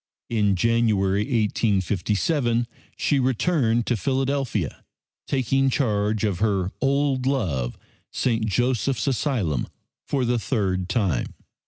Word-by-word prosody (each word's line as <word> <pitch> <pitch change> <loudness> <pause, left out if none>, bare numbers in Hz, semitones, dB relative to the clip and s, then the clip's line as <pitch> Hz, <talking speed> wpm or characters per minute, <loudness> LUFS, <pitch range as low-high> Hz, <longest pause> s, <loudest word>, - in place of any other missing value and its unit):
In 105 -4 +2
January, 105 -2 +2
1857, 115 - +1 0.3
she 145 - +1
returned 125 -2 +1
to 120 - +1
Philadelphia, 135 - -1 0.4
taking 135 0 +1
charge 110 -5 0
of 100 -5 0
her 95 -4 +1
old 135 -1 +1
love, 80 - -1 0.3
St. 115 -3 0
Joseph's 120 +2 0
Asylum, 115 - 0 0.4
for 135 -3 0
the 120 0 +1
third 95 -7 -1
time. 95 - 0
115 Hz, 105 wpm, -24 LUFS, 100-130 Hz, 0.4 s, In